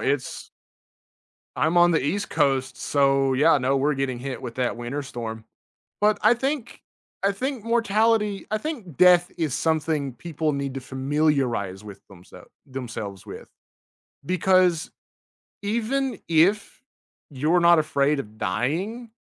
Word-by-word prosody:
it's 140 -1 -2 1.1
I'm 160 +3 +1
on 175 0 +6
the 160 - +2
east 195 +8 -2
coast, 135 -2 +1
so, 135 -1 +2
yeah, 150 +2 +4
no, 135 +2 +1
we're 145 +2 +1
getting 135 -2 -2
hit 130 +1 -6
with 120 -1 -7
that 125 -2 -1
winter 120 +5 -4
storm. 115 -4 -7 0.6
But 210 0 +3
I - - +6
think 265 0 -3 0.4
I 200 - +3
think 255 +2 -4
mortality 225 -2 +1
I 215 - 0
think 220 - -6
death 180 -1 +5
is 155 -6 -1
something 155 -4 -1
people 155 0 -3
need 140 -1 -3
to 135 - -3
familiarize 130 -8 -1
with 100 -2 -10
themselves 90 -2 -15 0.2
themselves 115 -7 -7
with, - - -10 0.8
because 185 -1 +2 0.7
even 235 +3 -1
if 180 +6 +2 0.5
you're 155 +6 +1
not 170 0 +6
afraid 145 -1 +1
of 110 -3 -8
dying, 175 - -2
150 Hz, 135 wpm, -24 LUFS, 130-195 Hz, 1.1 s, on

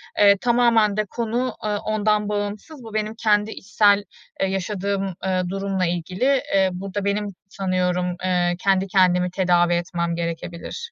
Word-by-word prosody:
E, 200 -1 +6
tamamen 230 -3 +3
de 215 - +1
konu, 240 +1 -2
e, - - 0
ondan 210 0 0
bağımsız. 210 +7 -4
Bu 220 -1 -10
benim 215 0 -2
kendi 210 0 +3
içsel, 205 0 +2 0.4
eee, 195 - +2
yaşadığım, 195 0 -2
eee, 185 -1 +1
durumla 195 -1 -1
ilgili. 185 +11 0
Eee, 190 -1 +4
burada 195 +2 -4
benim, 205 +1 0 0.2
sanıyorum, 180 -2 -1
eee, 180 -1 +1
kendi 195 0 +2
kendimi 180 -2 +3
tedavi 175 -2 +2
etmem 170 -1 -1
gerekebilir. 170 - -5
195 Hz, 145 wpm, -22 LUFS, 180-210 Hz, 0.4 s, E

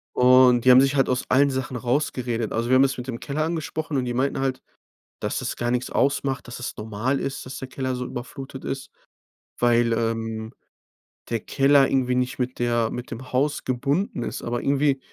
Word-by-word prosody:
Und 125 -1 +6
die 130 - +8
haben 130 +1 +8
sich 135 +1 +2
halt 135 -2 +2
aus 125 0 0
allen 140 +2 +4
Sachen 130 -1 -3
rausgeredet. 125 -3 -1
Also, 115 +2 -1
wir 130 - +5
haben 130 - +6
das 135 -1 +1
mit 125 +1 -6
dem 115 -2 -4
Keller 150 +2 -2
angesprochen. 160 -2 -3
Und 125 - 0
die 120 - -2
meinten 135 +3 0
halt, 135 -1 -1 0.6
dass - - -2
das - - -3
gar 120 0 -1
nix 125 0 -1
ausmacht, 135 -1 0
dass 120 - -8
das 120 - -5
normal 110 +5 -2
ist, 135 - -4
dass 130 - -7
der 130 - -7
Keller 130 -1 -3
so 125 0 -4
überflutet 135 +2 -8
ist, 135 -1 -5 0.7
weil, 120 -1 +3
ähm, 115 -1 -2 0.8
der 115 - 0
Keller 135 +3 +4
irgendwie 125 -2 +1
nicht 125 +1 -1
mit 125 0 -2
der 120 -1 +1
mit 125 0 -6
dem 125 +2 -8
Haus 145 +4 0
gebunden 140 - -1
ist, - - -4
aber 120 0 -2
irgendwie 140 -1 +2
130 Hz, 200 wpm, -24 LUFS, 120-135 Hz, 0.8 s, die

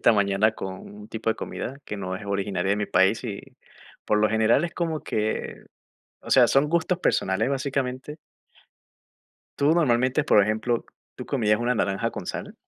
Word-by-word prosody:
Esta - - +5
mañana, 100 +1 +2
con 95 -3 -6 0.2
un 105 0 -12
tipo 110 0 -2
de - - -2
comida, 135 +3 -6
que 105 - -5
no 95 -1 -4
es 100 +1 -7
originaria 100 -1 -1
de 100 - 0
mi 105 - -2
país 95 +7 +2
y, 100 -4 -4 0.6
por 105 - +2
lo 105 0 +3
general, 110 +7 +3
es 170 - -5
como 165 -3 -2
que, 110 0 -3 0.6
o - - -11
sea, - - +6
son 140 +2 +3
gustos 170 +2 +1
personales, 100 - +1
básicamente. 135 +1 -3 1.4
Tú, 145 +3 +4
normalmente, 130 -3 +2
por 140 - +5
ejemplo, 110 +3 0 0.3
¿tú - - -7
comías 105 -6 +1
una 120 +1 0
naranja 100 -3 -1
con - - -7
sal? - - -5
110 Hz, 175 wpm, -25 LUFS, 100-135 Hz, 1.4 s, sea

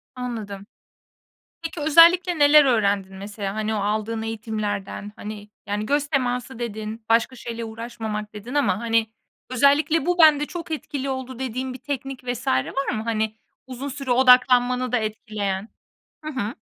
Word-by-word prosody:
Anladım. 215 -6 -6 1.0
Peki, 330 -1 -6
özellikle 335 +3 +5
neler 290 0 +7
öğrendin 200 -5 +1
mesela, 200 0 -5
hani, 215 0 -1
o - - -1
aldığın 215 +2 -1
eğitimlerden? 215 -2 -4
Hani, 210 0 -8 0.2
yani, 210 +1 -2
göz 290 +4 +1
teması 250 -3 -1
dedin, 220 -1 -5
başka 230 +3 +2
şeyle 235 -1 -6
uğraşmamak 220 -2 -6
dedin 215 +5 -8
ama, 275 -9 +1
hani, 230 -1 +1 0.4
özellikle 280 +4 +3
"Bu, 355 0 +1
bende 300 -2 +6
çok 335 0 -7
etkili 280 -3 -4
oldu." 260 -1 -5
dediğin 255 0 -3
bir 255 - -9
teknik 270 -1 -5
vs. 245 -1 -4
var 130 - 0
mı, 215 - -3
hani, 220 -1 -1 0.3
uzun 260 +2 -6
süre 275 -1 -4
odaklanmanı 250 0 +4
da 250 - +3
etkileyen? 215 -2 -3 0.5
Hı 310 - -4
hı. 235 -3 -3
240 Hz, 145 wpm, -23 LUFS, 215-270 Hz, 1.0 s, neler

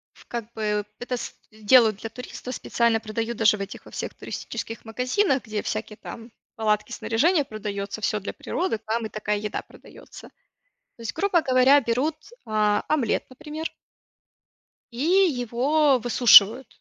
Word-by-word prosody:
в - - -19
как 235 -1 -6
бы 210 -1 -1
это 250 +1 -3
с - - -7 0.2
делают 215 0 +4
для 225 - -7
туристов, 250 +1 -8
специально 235 -1 +1
продают 225 +1 -4
даже 215 -1 +4
в - - -7
этих 195 0 -7
во - - -13
всех - - -5
туристических 225 +1 -7
магазинах, 255 - 0
где 215 -2 -3
всякие 215 0 -4
там 230 +1 -10 0.2
палатки, 215 -2 0
снаряжение 295 +7 +1
продается, 205 -2 -5
всё 210 0 0
для 200 - -6
природы, 360 -10 -2
там 225 +1 -1
и - - -5
такая 210 -1 -2
еда 210 +1 -4
продается. - - -15 0.7
То - - -15
есть, 230 - -4
грубо 390 -4 +2
говоря, 260 +1 +5
берут, 255 +6 0 0.3
а, 210 -2 +1
омлет, 280 -8 0
например. 305 +5 -6 1.2
И 235 +2 -6
его 290 - +3
высушивают. 240 0 +6
230 Hz, 150 wpm, -24 LUFS, 215-260 Hz, 1.2 s, высушивают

